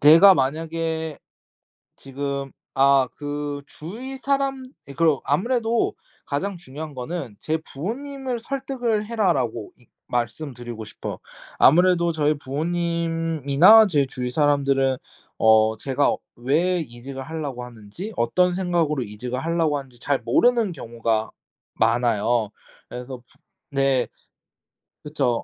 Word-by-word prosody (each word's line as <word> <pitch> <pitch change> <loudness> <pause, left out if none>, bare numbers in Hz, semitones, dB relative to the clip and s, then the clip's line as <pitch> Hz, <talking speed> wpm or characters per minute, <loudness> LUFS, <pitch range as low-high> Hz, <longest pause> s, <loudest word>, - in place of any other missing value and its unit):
내가 165 +7 +9
만약에 160 +2 -2 0.8
지금 140 0 -4 0.2
아 135 -1 +4
그 145 -1 -4
주위 230 - -8
사람 270 0 0 0.3
예 - - -7
그리고 155 -1 +2
아무래도 230 - +1 0.3
가장 185 +7 -2
중요한 150 -1 -8
거는 130 -3 -5
"제 160 +1 -1
부모님을 260 - -4
설득을 245 -4 -2
해라."라고 160 - 0
이 120 - -24 0.2
말씀드리고 120 -2 -4
싶어요. 105 - -7 0.4
아무래도 170 +2 +5
저희 150 -1 +2
부모님이나 165 +4 +3
제 145 -6 +2
주위 125 -1 -4
사람들은 140 -2 +2 0.4
어 110 0 +5
제가 135 +4 +1 0.2
왜 160 +9 +1
이직을 135 -1 -7
하려고 145 -5 -5
하는지 120 - -9
어떤 180 +9 +2
생각으로 170 -6 0
이직을 125 +4 -5
하려고 165 -3 +1
하는지 130 -3 -11
잘 140 +2 0
모르는 230 - +3
경우가 115 -5 -2 0.4
많아요. 115 -1 +2 0.4
그래서 125 +2 -7
부 120 - -25 0.5
네. 135 -2 +2 1.0
그쵸. 135 -6 0
145 Hz, 265 characters per minute, -23 LUFS, 125-175 Hz, 1.0 s, 내가